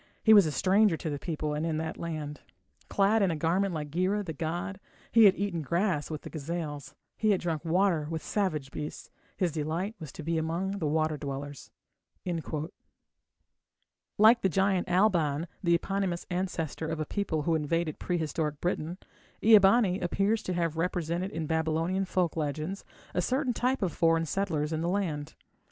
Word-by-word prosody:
He 220 Hz, -, +7 dB
was 200 Hz, -6 st, +7 dB
a -, -, -1 dB
stranger 195 Hz, +2 st, +3 dB
to 155 Hz, -, -4 dB
the 145 Hz, -, -3 dB
people 155 Hz, -2 st, -3 dB
and 150 Hz, +1 st, -2 dB
in 165 Hz, -2 st, -1 dB
that 160 Hz, +1 st, -3 dB
land. 155 Hz, -3 st, -5 dB, 0.5 s
Clad 205 Hz, +2 st, +3 dB
in 195 Hz, -, +3 dB
a 165 Hz, -, 0 dB
garment 175 Hz, +6 st, +1 dB
like 150 Hz, -3 st, -4 dB
Gira, 190 Hz, +5 st, 0 dB
the 160 Hz, -, -4 dB
god, 175 Hz, +5 st, -3 dB, 0.3 s
He 230 Hz, -2 st, +7 dB
had 195 Hz, -, +7 dB
eaten 195 Hz, -5 st, -2 dB
grass 170 Hz, +1 st, 0 dB
with 155 Hz, -2 st, -5 dB
the -, -, -7 dB
gazelles, 155 Hz, -1 st, -5 dB, 0.2 s
He 215 Hz, -, +1 dB
had 195 Hz, -3 st, +3 dB
drunk 165 Hz, -3 st, -2 dB
water 170 Hz, -2 st, +2 dB
with 160 Hz, -1 st, -4 dB
savage 155 Hz, -10 st, -1 dB
beasts. 150 Hz, 0 st, -6 dB, 0.3 s
His 180 Hz, -3 st, +1 dB
delight 165 Hz, +7 st, -2 dB
was 155 Hz, -4 st, -8 dB
to 160 Hz, -, -8 dB
be 165 Hz, +1 st, 0 dB
among 180 Hz, +5 st, -2 dB
water 155 Hz, -1 st, 0 dB
dwellers. 140 Hz, -1 st, -6 dB, 2.5 s
Like 220 Hz, +3 st, +7 dB
the 190 Hz, -, +2 dB
giant 190 Hz, 0 st, +1 dB
Alban, 170 Hz, -6 st, +2 dB, 0.2 s
the 170 Hz, -1 st, +4 dB
eponymous 190 Hz, 0 st, -2 dB
ancestor 175 Hz, -4 st, -2 dB
of 160 Hz, 0 st, -3 dB
a 155 Hz, -, -1 dB
people 165 Hz, -4 st, -2 dB
who 165 Hz, -, +1 dB
invaded 160 Hz, +1 st, -1 dB
prehistoric 160 Hz, -3 st, -2 dB
Britain, 175 Hz, -1 st, -2 dB, 0.5 s
Ea 220 Hz, -1 st, +9 dB
bani 195 Hz, -1 st, +4 dB
appears 200 Hz, +5 st, +1 dB
to 185 Hz, -, -3 dB
have 165 Hz, -2 st, -1 dB
represented 175 Hz, +1 st, -1 dB
in 165 Hz, -5 st, -4 dB
Babylonian 160 Hz, +4 st, 0 dB
folk 180 Hz, -3 st, 0 dB
legends 155 Hz, +5 st, -3 dB, 0.3 s
a 180 Hz, -, +1 dB
certain 255 Hz, -, 0 dB
type 250 Hz, 0 st, 0 dB
of 175 Hz, -5 st, 0 dB
foreign 165 Hz, 0 st, +2 dB
settlers 160 Hz, -4 st, -1 dB
in 160 Hz, -, -1 dB
the 170 Hz, -, 0 dB
land. 160 Hz, -6 st, -2 dB
170 Hz, 175 wpm, -29 LUFS, 155-195 Hz, 2.5 s, Ea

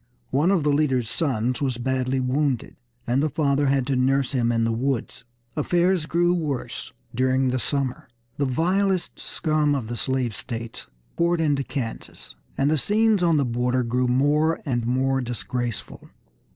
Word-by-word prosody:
One 150 Hz, +7 st, +3 dB
of 190 Hz, -6 st, +2 dB
the 150 Hz, -, +2 dB
leader's 130 Hz, -6 st, +1 dB
sons 125 Hz, -5 st, -1 dB
was 130 Hz, -4 st, 0 dB
badly 130 Hz, +1 st, 0 dB
wounded, 130 Hz, 0 st, -1 dB, 0.3 s
and 125 Hz, +3 st, +1 dB
the 155 Hz, -, +1 dB
father 140 Hz, -1 st, +1 dB
had 135 Hz, -1 st, +2 dB
to 135 Hz, 0 st, 0 dB
nurse 130 Hz, +1 st, +2 dB
him 120 Hz, -4 st, +1 dB
in 115 Hz, -1 st, +1 dB
the 115 Hz, -, +1 dB
woods. 125 Hz, +1 st, -2 dB, 0.3 s
Affairs 175 Hz, +2 st, +1 dB
grew 175 Hz, +1 st, +2 dB
worse 150 Hz, -7 st, -3 dB, 0.2 s
during 130 Hz, +1 st, +2 dB
the 130 Hz, +1 st, 0 dB
summer. 135 Hz, -1 st, -2 dB, 0.3 s
The 145 Hz, -, +1 dB
vilest 180 Hz, +7 st, 0 dB
scum 155 Hz, -2 st, 0 dB
of 120 Hz, -5 st, -4 dB
the 120 Hz, -, -3 dB
slave 125 Hz, -2 st, -1 dB
states 115 Hz, 0 st, -6 dB, 0.3 s
poured 170 Hz, 0 st, +2 dB
into 145 Hz, -3 st, +1 dB
Kansas, 125 Hz, -, -6 dB, 0.2 s
and 140 Hz, +2 st, +2 dB
the 155 Hz, -, +2 dB
scenes 215 Hz, -, +3 dB
on 170 Hz, -3 st, +3 dB
the 140 Hz, -, +2 dB
border 125 Hz, +1 st, 0 dB
grew 125 Hz, +2 st, 0 dB
more 150 Hz, +6 st, +2 dB
and 120 Hz, -5 st, -1 dB
more 135 Hz, +2 st, +1 dB
disgraceful. 120 Hz, -1 st, -4 dB
135 Hz, 165 wpm, -24 LUFS, 125-155 Hz, 0.3 s, One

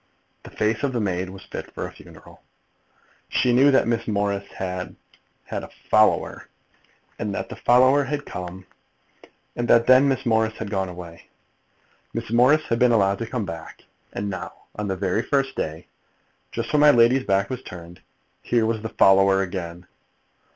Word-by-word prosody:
The -, -, -12 dB
face 110 Hz, +1 st, -1 dB
of 140 Hz, -2 st, -1 dB
the 120 Hz, -, -1 dB
maid 95 Hz, -3 st, -2 dB
was 95 Hz, +1 st, -11 dB
fit -, -, -7 dB
for -, -, -4 dB
a -, -, -8 dB
funeral. -, -, -16 dB, 0.9 s
She 125 Hz, -, +2 dB
knew 135 Hz, +4 st, +5 dB
that 135 Hz, -, +3 dB
Miss 115 Hz, -1 st, -1 dB
Morris 100 Hz, -2 st, -1 dB
had 90 Hz, -1 st, -5 dB, 0.5 s
had -, -, -5 dB
a -, -, -9 dB, 0.2 s
"follower," 110 Hz, 0 st, +2 dB, 0.7 s
that 100 Hz, -2 st, -3 dB
the -, -, -7 dB
follower 130 Hz, +4 st, +4 dB
had 145 Hz, +2 st, -3 dB
come, 90 Hz, +1 st, -7 dB, 0.9 s
and 120 Hz, 0 st, -2 dB
that 115 Hz, 0 st, +5 dB
then 130 Hz, +3 st, +6 dB
Miss 135 Hz, -1 st, -1 dB
Morris 110 Hz, -1 st, +1 dB
had 105 Hz, -2 st, -6 dB
gone 95 Hz, -2 st, -1 dB
away. 85 Hz, -2 st, -11 dB, 0.9 s
Miss -, -, -4 dB
Morris 130 Hz, +6 st, +4 dB
had 115 Hz, -, 0 dB
been 125 Hz, -1 st, +4 dB
allowed 100 Hz, -3 st, +2 dB
to 115 Hz, -, -4 dB
come 125 Hz, -5 st, -2 dB
back; 80 Hz, -2 st, -9 dB, 0.3 s
and 100 Hz, -, -4 dB
now, 95 Hz, -2 st, -5 dB, 0.2 s
on 105 Hz, -1 st, -4 dB
the 95 Hz, -, -1 dB
very 95 Hz, +3 st, 0 dB
first 135 Hz, +1 st, 0 dB
day, 80 Hz, +2 st, -4 dB, 0.7 s
just -, -, -4 dB
when 150 Hz, -, +4 dB
my 150 Hz, 0 st, +7 dB
lady's 125 Hz, +1 st, +4 dB
back 100 Hz, +4 st, +1 dB
was 130 Hz, -, -4 dB
turned, 85 Hz, 0 st, -11 dB, 0.4 s
here 115 Hz, -2 st, +1 dB
was 110 Hz, -1 st, -1 dB
the 110 Hz, -, -5 dB
follower 95 Hz, -1 st, +4 dB
again! 90 Hz, -2 st, -6 dB
110 Hz, 170 wpm, -23 LUFS, 95-125 Hz, 0.9 s, my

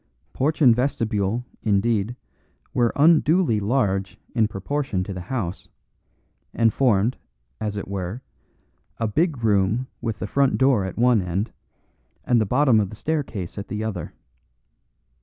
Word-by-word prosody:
Porch 155 Hz, +3 st, 0 dB
and 120 Hz, -4 st, +7 dB
vestibule, 115 Hz, -3 st, -1 dB, 0.2 s
indeed, 105 Hz, +2 st, +1 dB, 0.6 s
were 120 Hz, -2 st, +2 dB
unduly 160 Hz, -, +4 dB
large 100 Hz, -4 st, 0 dB, 0.2 s
in 115 Hz, -3 st, +3 dB
proportion 105 Hz, 0 st, -2 dB
to 100 Hz, -, -6 dB
the 90 Hz, -, -6 dB
house, 95 Hz, -4 st, -4 dB, 0.9 s
and 115 Hz, -1 st, +3 dB
formed, 120 Hz, -3 st, +2 dB, 0.4 s
as 105 Hz, -2 st, -3 dB
it 100 Hz, -, -5 dB
were, 100 Hz, +5 st, -4 dB, 0.7 s
a 115 Hz, -, -1 dB
big 145 Hz, -, 0 dB
room 105 Hz, +3 st, +2 dB, 0.2 s
with 115 Hz, -2 st, -3 dB
the -, -, -4 dB
front 135 Hz, +6 st, +2 dB
door 130 Hz, -7 st, +3 dB
at 95 Hz, -, -6 dB
one 120 Hz, -2 st, +4 dB
end, 90 Hz, +4 st, -2 dB, 0.7 s
and 120 Hz, -2 st, +3 dB
the 110 Hz, -, 0 dB
bottom 125 Hz, -1 st, +4 dB
of 100 Hz, -3 st, 0 dB
the 110 Hz, -, -9 dB
staircase 120 Hz, -, -3 dB
at 100 Hz, -, -6 dB
the 105 Hz, +1 st, -4 dB
other. 100 Hz, -7 st, -4 dB
110 Hz, 140 wpm, -23 LUFS, 100-130 Hz, 0.9 s, and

